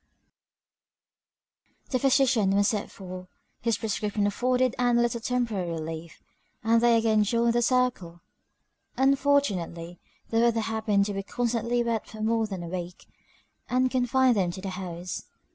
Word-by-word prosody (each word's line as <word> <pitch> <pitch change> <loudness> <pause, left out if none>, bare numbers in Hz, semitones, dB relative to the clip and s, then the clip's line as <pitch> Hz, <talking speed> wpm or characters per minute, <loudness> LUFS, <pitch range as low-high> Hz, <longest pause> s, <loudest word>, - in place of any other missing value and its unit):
XII. - - -40 0.2
The 255 - +1
physician 255 -7 +3
was 200 0 +3
sent 210 -2 -2
for; 185 -1 -9 0.3
his 230 -2 +1
prescription 210 -1 -1
afforded 250 +4 +1
Ann 245 -1 +3
a - - +4
little 235 -1 -1
temporary 225 -7 -1
relief; 160 0 -6 0.4
and 230 +1 +3
they 235 -1 +5
again 220 -2 +3
joined 230 +2 +1
the 240 - +2
circle. 240 -9 0 0.8
Unfortunately, 260 -12 +1 0.3
the 225 - +2
weather 230 -1 +3
happened 215 -2 +1
to 205 - -3
be 195 - -2
constantly 240 +2 -1
wet 230 -2 -2
for 220 - -11
more 225 0 +1
than 190 -4 -5
a - - -6
week, 175 0 -6 0.6
and 255 0 +2
confined 255 0 +3
them 185 -3 +1
to 185 +2 -6
the 195 - -4
house. 180 -1 -6
225 Hz, 150 wpm, -27 LUFS, 190-245 Hz, 0.8 s, they